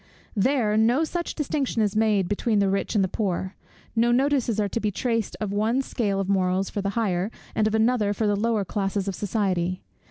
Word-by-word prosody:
There, 215 -1 +2
no 235 +7 +3
such 345 +2 -3
distinction 275 -6 0
is 205 -1 -1
made 215 -4 +2
between 210 +3 0
the 200 -1 +2
rich 195 +3 -1
and 200 - +4
the - - +1
poor. 190 -1 -2 0.4
No 235 +1 +3
notices 255 -3 +2
are 205 - +2
to 215 - -2
be 215 - 0
traced 230 +1 -2
of 205 -2 -3
one 225 +6 +1
scale 205 -6 -1
of 195 - -1
morals 190 -1 +1
for 205 - -2
the 200 - -1
higher, 195 -3 0 0.2
and 215 - +2
of 220 - 0
another 220 -2 +2
for 215 +2 -1
the 205 -1 +2
lower 215 -1 0
classes 195 0 -2
of 195 - -1
society. 185 -3 -1
210 Hz, 210 wpm, -25 LUFS, 195-230 Hz, 0.4 s, and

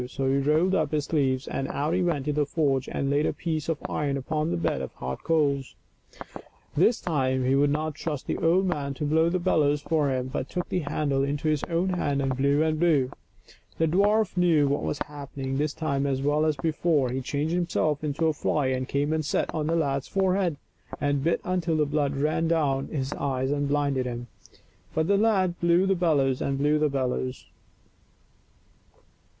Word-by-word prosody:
So 135 +1 -3
he 135 +1 +2
rolled 155 +7 +2
up 155 -5 0
his 150 -2 0
sleeves 135 -4 0
and 135 - -3
out 150 +3 -1
he 185 - +1
went 155 -6 -1
into 150 - +1
the 145 -1 0
forge 140 -5 0
and 140 0 -1
laid 145 +2 +2
a - - -1
piece 160 -2 -3
of 165 - 0
iron 140 -2 -1
upon 155 +4 -2
the - - -1
bed 85 0 -1
of - - -5
hot 65 +1 -5
coals. 140 -5 0 1.0
This 205 +9 +3
time 130 -6 0
he 130 - +2
would 140 +1 +3
not 155 +1 -1
trust 150 -2 -4
the - - -2
old 175 +4 +3
man 145 -6 -2
to 150 - -3
blow 160 +3 +3
the 180 - 0
bellows 150 -5 +2
for 150 -1 0
him, 130 0 -2
but 130 - -3
took 180 -1 -3
the 180 - 0
handle 145 -3 -1
into 145 +2 -2
his 150 -2 0
own 175 +2 0
hand 145 -6 0
and 135 -2 0
blew 140 +3 +2
and 155 -1 0
blew. 150 -7 +2 0.7
The 165 - +2
dwarf 205 +5 +2
knew 165 -5 +3
what 140 +1 0
was - - -2
happening 140 -2 -5
this 150 +1 0
time 140 -3 -1
as 135 -1 -1
well 150 +2 +2
as 155 - +1
before. 150 -2 +1
He 130 +1 -2
changed 145 +5 -2
himself 165 -4 0
into 150 +2 -1
a 160 - +3
fly 145 -2 0
and 130 0 -1
came 145 +2 0
and 160 0 0
sat 145 - -1
on 155 -2 -1
the 165 - +1
lad's 140 -4 0
forehead, 190 -4 +1 0.4
and 145 -1 0
bit 170 +2 +1
until 175 -3 0
the 150 - +3
blood 145 -1 0
ran 155 +3 +1
down 145 -5 +1
into - - -8
his 135 +1 -2
eyes 130 -1 -1
and 145 0 0
blinded 140 -3 0
him; 120 0 -5 0.7
but 160 0 +1
the 200 - +3
lad 195 -5 +2
blew 170 +2 +3
the 195 - +3
bellows 145 -8 +1
and 135 0 -1
blew 150 +2 +2
the 150 0 +2
bellows. 130 -1 -2
150 Hz, 205 wpm, -26 LUFS, 140-165 Hz, 1.0 s, This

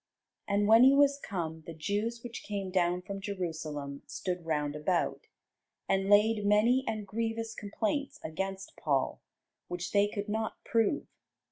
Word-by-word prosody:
And 205 0 +2
when 225 +3 +8
he 270 +2 +7
was 280 0 +4
come, 165 - -4
the 165 - -7
Jews 210 +8 -2
which 240 -1 -6
came 200 -2 -4
down 180 -1 +1
from 195 +1 -6
Jerusalem 160 -7 -4
stood 180 -2 -4
round 150 -2 0
about, 165 +4 -1 0.6
and 195 0 +1
laid 210 +1 +5
many 215 +6 +4
and 215 -2 -2
grievous 225 +1 -2
complaints 225 +7 -2
against 195 +4 -4
Paul, 140 -3 0 0.5
which 175 0 -4
they 200 0 +4
could 205 0 -4
not 220 +1 -2
prove. 230 +5 +1
200 Hz, 145 wpm, -31 LUFS, 175-225 Hz, 0.6 s, when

